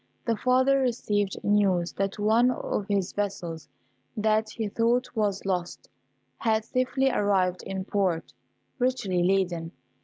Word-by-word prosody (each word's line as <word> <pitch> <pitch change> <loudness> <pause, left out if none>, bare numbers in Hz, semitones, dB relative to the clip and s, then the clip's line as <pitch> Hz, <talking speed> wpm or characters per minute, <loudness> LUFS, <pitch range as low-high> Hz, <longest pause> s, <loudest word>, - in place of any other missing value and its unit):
The 230 - +1
father 260 +4 +3
received 210 -6 0
news 195 -4 +2
that 195 0 -2
one 220 +4 +4
of 210 -5 -2
his 200 -2 0
vessels, 170 -6 -4 0.5
that 215 0 +2
he 220 0 -3
thought 235 +4 0
was 205 -3 -1
lost, 180 -2 -3 0.5
had 220 -1 +1
safely 255 +2 +1
arrived 190 -4 +1
in 190 -1 -4
port, 190 -5 -1 0.5
richly 245 -8 0
laden. 175 -2 0
205 Hz, 125 wpm, -27 LUFS, 190-230 Hz, 0.5 s, one